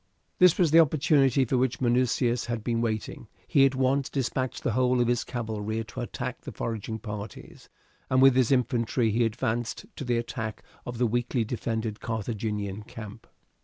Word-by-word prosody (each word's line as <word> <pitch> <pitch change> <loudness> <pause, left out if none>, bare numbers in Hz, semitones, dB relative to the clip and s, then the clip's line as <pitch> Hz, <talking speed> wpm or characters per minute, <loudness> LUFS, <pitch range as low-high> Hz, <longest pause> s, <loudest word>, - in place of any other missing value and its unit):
This 180 -2 +6
was 170 -5 +3
the 165 - +7
opportunity 140 -4 +4
for 125 +1 +1
which 130 -1 0
Minucius 120 0 +1
had 120 -2 -3
been 115 -1 0
waiting. 110 -3 -3 0.2
He 135 -1 +5
at 135 - -3
once 135 +1 +1
despatched 130 -1 -2
the 120 - +1
whole 125 +2 +2
of 120 - +2
his 120 0 +1
cavalry 110 -2 -3
to 110 +3 -7
attack 120 - -5
the - - -8
foraging 110 -1 -4
parties, 105 -2 -8 0.4
and 130 - +3
with 135 -1 +7
his 130 -2 +3
infantry 120 -2 +1
he 115 +3 +2
advanced 115 +1 -2
to - - -4
the 120 -2 0
attack 110 -2 -4 0.2
of 120 -1 -5
the 125 - +2
weakly 120 +1 0
defended 110 -1 -3
Carthaginian 105 -2 -3
camp. 110 -1 -10
120 Hz, 170 wpm, -27 LUFS, 110-130 Hz, 0.4 s, the